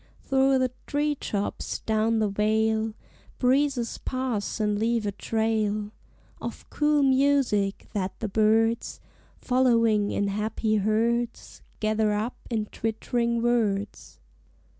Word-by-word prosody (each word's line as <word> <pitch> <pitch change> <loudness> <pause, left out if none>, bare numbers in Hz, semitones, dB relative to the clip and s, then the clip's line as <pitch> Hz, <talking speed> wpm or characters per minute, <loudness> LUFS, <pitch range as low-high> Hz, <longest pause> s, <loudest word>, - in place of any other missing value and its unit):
Thro' 270 0 +2
the 255 -1 +1 0.2
tree 295 +1 +1
tops, 205 -7 -3
down 220 +1 +1
the 215 -1 +2
vale, 220 +2 +1 0.4
Breezes 260 -2 +1
pass 255 -5 -3
and 210 -1 0
leave 230 0 +1
a 205 - 0
trail 215 -1 -1 0.5
Of - - -7
cool 295 -1 +2
music 265 -7 +2
that 195 -2 -3
the 220 - -2
birds, 220 +3 +2 0.4
Following 230 -5 +2
in 200 0 0
happy 215 +1 -1
herds, 230 +3 -1 0.2
Gather 215 0 +1
up 215 +4 -2
in 220 -3 -1
twittering 235 +2 -1
words. 210 -4 -1
220 Hz, 115 wpm, -26 LUFS, 210-245 Hz, 0.5 s, Thro